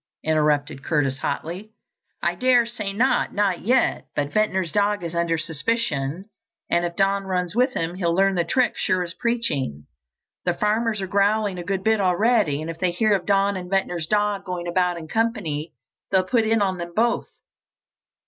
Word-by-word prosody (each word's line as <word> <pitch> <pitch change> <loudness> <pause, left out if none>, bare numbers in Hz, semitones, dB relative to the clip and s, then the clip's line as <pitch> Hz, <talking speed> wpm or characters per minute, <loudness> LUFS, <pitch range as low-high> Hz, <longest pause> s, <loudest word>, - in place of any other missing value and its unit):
interrupted 150 -2 +1
Curtis 140 -4 0
hotly. 185 +10 -4 0.5
"I 170 - +2
daresay 235 -1 +1
not, 235 +7 +1
not 200 -3 +1
yet. 250 +5 +1
But 145 0 -2
Ventnor's 190 -5 +1
dog 205 -1 +1
is 170 0 -4
under 170 -1 0
suspicion, 160 -1 -2 0.5
and 170 0 +2
if 170 0 -4
Don 195 +1 +1
runs 180 -1 -2
with 250 +2 +2
him 165 +1 -1
he'll 175 -2 0
learn 195 +1 +3
the 175 -2 +1
trick 250 +9 +1
sure 185 -2 0
as 170 -1 -6
preaching. 185 - -2 0.6
The 175 -1 0
farmers 215 +1 0
are - - -1
growling 200 0 +1
a - - -5
good 190 +1 -2
bit 220 -1 +2
already, 190 -5 +2
and 165 - -4
if 165 - -11
they 185 - +2
hear 210 +5 +2
of 190 -3 -1
Don 200 0 +2
and 180 -1 -6
Ventnor's 180 -4 -1
dog 205 0 +1
going 180 -2 -4
about 180 0 +1
in 160 -1 -8
company, 175 -9 -1 0.4
they'll 190 -1 +3
put 225 +4 +1
it 225 0 +2
on 190 -2 -1
them 170 0 -6
both. 235 +2 +1
190 Hz, 175 wpm, -23 LUFS, 170-210 Hz, 0.6 s, learn